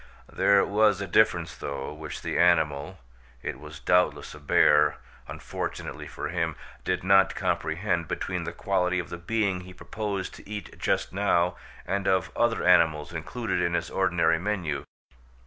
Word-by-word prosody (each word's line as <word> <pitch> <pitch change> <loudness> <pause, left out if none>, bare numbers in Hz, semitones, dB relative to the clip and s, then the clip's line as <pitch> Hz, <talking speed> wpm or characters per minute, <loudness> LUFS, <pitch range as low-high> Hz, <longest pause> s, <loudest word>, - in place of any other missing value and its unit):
There 100 -1 +4
was 105 0 +3
a 100 - -3
difference, 85 -4 +2
though, 70 +1 -5
which 75 0 -8
the - - -1
animal, 85 -1 +2 0.5
it - - -4
was 75 0 -10
doubtless 90 +2 +1
a 75 - -11
bear 75 +1 +4 0.3
unfortunately - - -6
for - - -5
him, 85 -3 -1 0.3
did 90 - -1
not 95 0 +4
comprehend, 85 +1 -1
between - - -3
the - - -4
quality 90 0 0
of 90 - -3
the 85 - -6
being 100 0 0
he 90 0 -12
proposed 100 -1 -4
to - - -13
eat 105 -1 -7
just - - 0
now 90 -3 +2 0.3
and 100 +1 -1
of 95 0 +1
other 120 -1 +1
animals 85 -3 +4
included 110 +8 -3
in 85 0 +1
his 85 - -2
ordinary 85 -3 +2
menu. 90 -7 -2
90 Hz, 155 wpm, -27 LUFS, 80-100 Hz, 0.5 s, There